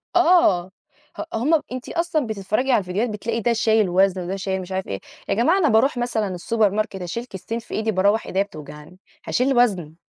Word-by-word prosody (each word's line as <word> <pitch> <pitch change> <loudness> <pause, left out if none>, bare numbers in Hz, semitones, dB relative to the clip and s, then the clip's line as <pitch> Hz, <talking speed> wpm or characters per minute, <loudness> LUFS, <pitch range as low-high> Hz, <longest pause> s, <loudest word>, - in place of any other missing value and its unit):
آه، 335 - +4 0.5
ه - - -3
هم 290 +8 +2
أنتِ 255 0 -6
أصلًا 335 -5 -1
بتتفرجي 215 +5 -1
على 240 - +4
الفيديوهات 200 +5 -2
بتلاقي 225 +2 -3
ده 235 +2 +1
شايل 220 -3 +2
وزن 190 +1 +2
وده 180 +2 -3
شايل 190 -1 -3
مش 185 +1 -10
عارف 190 0 -3
إيه، 95 - -4 0.3
يا - - +2
جماعة 250 - +3
أنا 335 -7 +3
باروح 245 +4 +3
مثلًا 240 -3 -1
السوبر 215 +4 +1
ماركت 205 -2 -2
أشيل 180 +7 -4
كيستين 225 +1 -6
في 230 - -12
إيدي 220 0 0
باروّح 200 +3 +2
إيديا 190 +1 +1
بتوجعني، 150 -1 -12 0.3
هاشيل 260 +1 +1
وزن؟ 185 -10 +1
215 Hz, 195 wpm, -22 LUFS, 190-245 Hz, 0.5 s, آه